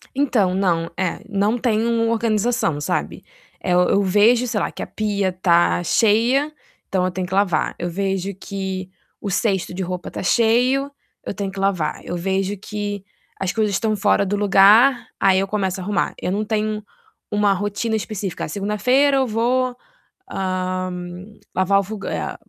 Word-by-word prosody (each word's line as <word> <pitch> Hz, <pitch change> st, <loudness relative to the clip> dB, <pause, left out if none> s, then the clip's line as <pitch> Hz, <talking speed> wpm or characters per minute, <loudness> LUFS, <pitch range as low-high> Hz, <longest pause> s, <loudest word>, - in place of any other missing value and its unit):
Então, 245 Hz, -10 st, +2 dB
não, 170 Hz, -4 st, +1 dB
eh, 185 Hz, -2 st, -2 dB
não 205 Hz, +3 st, +1 dB
tem 225 Hz, -2 st, +1 dB
um 230 Hz, -1 st, +1 dB
organização, 225 Hz, -, 0 dB
sabe? -, -, -2 dB, 0.4 s
Eh, 180 Hz, -, 0 dB
eu 180 Hz, +3 st, +3 dB
vejo, 215 Hz, +6 st, +4 dB
sei 220 Hz, -3 st, -1 dB
lá, -, -, -1 dB
que -, -, -8 dB
a -, -, -4 dB
pia 205 Hz, -3 st, -1 dB
tá 175 Hz, -1 st, +2 dB
cheia, 235 Hz, -, +3 dB, 0.4 s
então 185 Hz, -1 st, 0 dB
eu 185 Hz, -, -1 dB
tenho 185 Hz, 0 st, -3 dB
que 185 Hz, -, -7 dB
lavar. 190 Hz, -5 st, +1 dB
Eu 175 Hz, -, -3 dB
vejo 195 Hz, +1 st, -2 dB
que 190 Hz, -1 st, -5 dB, 0.3 s
o 205 Hz, -, -3 dB
cesto 195 Hz, -2 st, 0 dB
de 190 Hz, +1 st, -3 dB
roupa 180 Hz, -1 st, -5 dB
tá -, -, -6 dB
cheio, 250 Hz, +7 st, +2 dB, 0.3 s
eu -, -, -3 dB
tenho 200 Hz, -1 st, -4 dB
que 195 Hz, -, -8 dB
lavar. 185 Hz, -6 st, 0 dB
Eu 175 Hz, -, -4 dB
vejo 190 Hz, +3 st, -1 dB
que 205 Hz, 0 st, -5 dB, 0.4 s
as 190 Hz, -1 st, -1 dB
coisas 210 Hz, -2 st, +1 dB
tão 220 Hz, -2 st, 0 dB
fora 200 Hz, 0 st, +2 dB
do 205 Hz, +2 st, -1 dB
lugar, 205 Hz, +6 st, +5 dB
aí 190 Hz, -1 st, +4 dB
eu 195 Hz, -, -1 dB
começo 190 Hz, -2 st, -1 dB
a -, -, -5 dB
arrumar. 205 Hz, +2 st, -1 dB
Eu -, -, -1 dB
não 205 Hz, +3 st, 0 dB
tenho 215 Hz, 0 st, -2 dB, 0.5 s
uma 205 Hz, -1 st, +3 dB
rotina 205 Hz, +3 st, -2 dB
específica. 205 Hz, -3 st, -4 dB
Segunda-feira 250 Hz, -, +2 dB
eu 265 Hz, -1 st, +2 dB
vou, 245 Hz, +3 st, 0 dB, 0.6 s
hã, 185 Hz, -1 st, -2 dB, 0.6 s
lavar 190 Hz, +2 st, +3 dB
o -, -, 0 dB
fog 205 Hz, +1 st, -7 dB
é -, -, -3 dB
200 Hz, 170 wpm, -21 LUFS, 185-220 Hz, 0.6 s, lugar